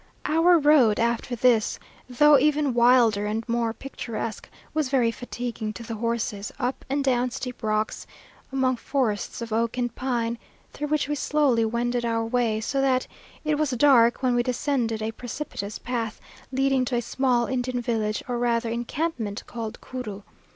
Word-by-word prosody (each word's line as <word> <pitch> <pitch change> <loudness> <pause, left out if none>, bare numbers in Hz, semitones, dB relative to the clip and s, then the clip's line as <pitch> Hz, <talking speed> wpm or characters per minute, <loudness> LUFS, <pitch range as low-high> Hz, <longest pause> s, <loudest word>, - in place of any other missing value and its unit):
Our 335 +3 +5
road 290 -8 +5
after 235 +1 0
this, 235 -2 +3 0.3
though 290 +3 +6
even 295 -1 +2
wilder 235 -4 +4
and 220 +2 -3
more 235 -1 0
picturesque, 230 -3 -6 0.2
was 310 -4 0
very 250 -4 +3
fatiguing 235 -2 -5
to 235 - -8
the 230 - -6
horses 220 -2 -2
up 255 -1 -2
and 280 +1 0
down 250 -2 +2
steep 250 0 -6
rocks, 215 -1 -1 0.4
among 260 -2 +1
forests 240 -4 -2
of 230 -1 -5
oak 230 +2 0
and 245 -2 -1
pine, 235 -3 -2 0.3
through 295 - -3
which 300 -1 0
we 295 - -1
slowly 280 -5 +2
wended 240 +2 -1
our 230 -1 0
way; 225 -2 +1
so 270 +5 -1
that 260 -1 +2 0.4
it 300 -1 +1
was 305 -2 +1
dark 250 -2 +4
when 255 -1 +3
we 240 - +3
descended 240 -3 -1
a 220 - -1
precipitous 225 -3 -6
path, 230 -3 -3 0.3
leading 270 0 +2
to 250 - -2
a 240 - +1
small 245 0 +1
Indian 255 -1 -2
village, 225 -3 -1
or 245 -1 -2
rather 235 -1 +1
encampment, 235 -2 -3
called 225 -2 -6
Curu. 215 -6 -6
240 Hz, 165 wpm, -25 LUFS, 230-265 Hz, 0.4 s, though